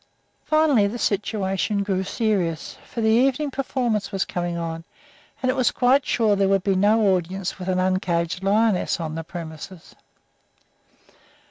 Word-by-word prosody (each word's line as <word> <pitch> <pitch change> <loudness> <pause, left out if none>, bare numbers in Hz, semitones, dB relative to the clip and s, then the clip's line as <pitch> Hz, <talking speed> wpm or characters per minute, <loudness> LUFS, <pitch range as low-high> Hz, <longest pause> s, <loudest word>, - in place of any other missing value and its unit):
Finally, 310 -9 +3
the 220 +4 -4
situation 200 -1 -1
grew 190 -2 -1
serious, 185 -7 -1
for 235 - -6
the 220 - +2
evening 270 +5 +2
performance 245 -6 -1
was 195 -1 -1
coming 175 -1 -3
on, 165 -1 -4 0.6
and 255 - +3
it - - -3
was 255 -3 +3
quite 260 +3 +2
sure 220 -3 +2
there 195 -1 +2
would 195 -1 +2
be 195 - +2
no 205 +1 +3
audience 185 +2 -4
with 180 - -6
an 185 -1 +1
uncaged 185 -2 0
lioness 205 -2 +2
on 160 -2 -4
the 165 +1 -4
premises. 165 +1 -9
195 Hz, 150 wpm, -23 LUFS, 180-225 Hz, 0.6 s, Finally